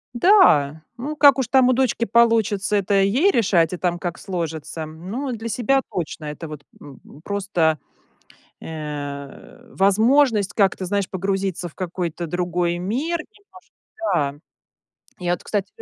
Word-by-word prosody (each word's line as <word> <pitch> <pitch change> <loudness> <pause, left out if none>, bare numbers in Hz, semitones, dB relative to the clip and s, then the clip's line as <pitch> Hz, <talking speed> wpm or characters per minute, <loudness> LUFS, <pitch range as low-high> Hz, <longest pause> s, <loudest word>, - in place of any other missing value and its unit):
Да. 160 - +5 0.2
Ну, 295 +5 -5
как 285 -3 +7
уж 255 - 0
там 260 0 +5
у 255 - +4
дочки 250 -2 +1
получится, 220 -2 +2
это 200 0 +2
ей 255 - +3
решать 185 - +2
и - - -3
там, 175 -1 -1
как 175 -1 -4
сложится. 160 -4 -5
Ну, 190 - -5
для 230 0 -5
себя 250 +5 +1
точно. 165 -2 -4
Это 150 +2 -6
вот, 150 -2 -8 0.2
м, 140 -3 -13 0.2
просто, 185 -6 0 0.8
э, 150 - -8
возможность 215 +2 +3
как-то, 195 -2 +1
знаешь, 200 +1 -1
погрузиться 190 -1 -2
в - - -24
какой-то 175 -2 -4
другой 175 +1 -1
мир 270 - -2
немножко, 400 +3 -14 0.6
да. 140 -1 0 0.9
Я 175 - 0
вот, - - -5
кстати 205 -2 -2
195 Hz, 140 wpm, -22 LUFS, 170-235 Hz, 0.9 s, как